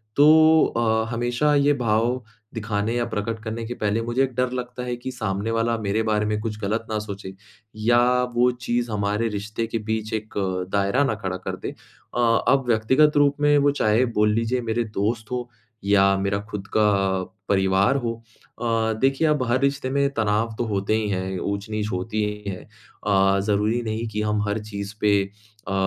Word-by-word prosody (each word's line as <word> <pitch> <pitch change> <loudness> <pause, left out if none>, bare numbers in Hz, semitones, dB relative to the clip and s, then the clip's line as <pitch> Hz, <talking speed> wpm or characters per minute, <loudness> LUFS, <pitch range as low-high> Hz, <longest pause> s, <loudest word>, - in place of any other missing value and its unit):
तो 155 +2 +6
अ, 110 -1 +1
हमेशा 120 +5 +1
ये 145 +1 +4
भाव 120 0 0 0.3
दिखाने 105 0 -2
या 120 -1 0
प्रकट 110 +2 -3
करने 115 +1 -4
के 120 - -4
पहले 110 -1 -1
मुझे 120 +3 +2
एक 130 -1 -2
डर 125 0 0
लगता 125 0 -5
है 125 0 -2
कि 125 +2 -6
सामने 110 -3 -2
वाला 115 +1 +1
मेरे 105 +1 0
बारे 105 0 +1
में 105 0 -1
कुछ 105 -1 -4
गलत 110 +3 -1
ना 110 - -1
सोचे, 100 -2 -7 0.4
या 120 +3 +3
वो 125 +1 +4
चीज़ 120 -1 -2
हमारे 105 +2 0
रिश्ते 105 +2 -3
के 115 - -2
बीच 110 0 -2
एक 110 -1 -4 0.4
दायरा 100 +7 +2
ना 135 -6 0
खड़ा 95 -1 -2
कर 95 - -5
दे। - - -3 0.5
अ 120 - +1 0.3
अब 135 0 +4
व्यक्तिगत 130 +7 +3
रूप 145 -1 +4
में 145 0 +5
वो 145 0 +4
चाहे 115 -3 +2
बोल 105 0 +4
लीजिए 115 +3 0
मेरे 115 0 -1
दोस्त 110 +3 -1
हो 125 -1 -3 0.3
या 100 -1 +4
मेरा 100 +1 0
खुद 95 -2 -5
का 100 -3 +2 0.3
परिवार 95 +4 +3
हो 115 - 0 0.5
अ, 115 -1 +1
देखिए 135 +4 +2
अब 150 -3 +2
हर 130 - +3
रिश्ते 140 -1 0
में 140 +1 +1
तनाव 110 0 0
तो - - 0
होते 100 -1 -1
ही 110 -1 -1
हैं, 95 -1 -2
ऊँच-नीच 105 +2 -3
होती 105 +4 -2
ही 105 0 -4
है। 95 - -7 0.5
अ, 95 -1 +3
ज़रूरी 105 +3 +1
नहीं 110 +1 -3
कि 105 0 -3
हम 105 0 0
हर 105 +2 -1
चीज़ 100 -1 -5
पे 100 -1 +4 0.5
अ - - -2
110 Hz, 190 wpm, -23 LUFS, 105-120 Hz, 0.5 s, तो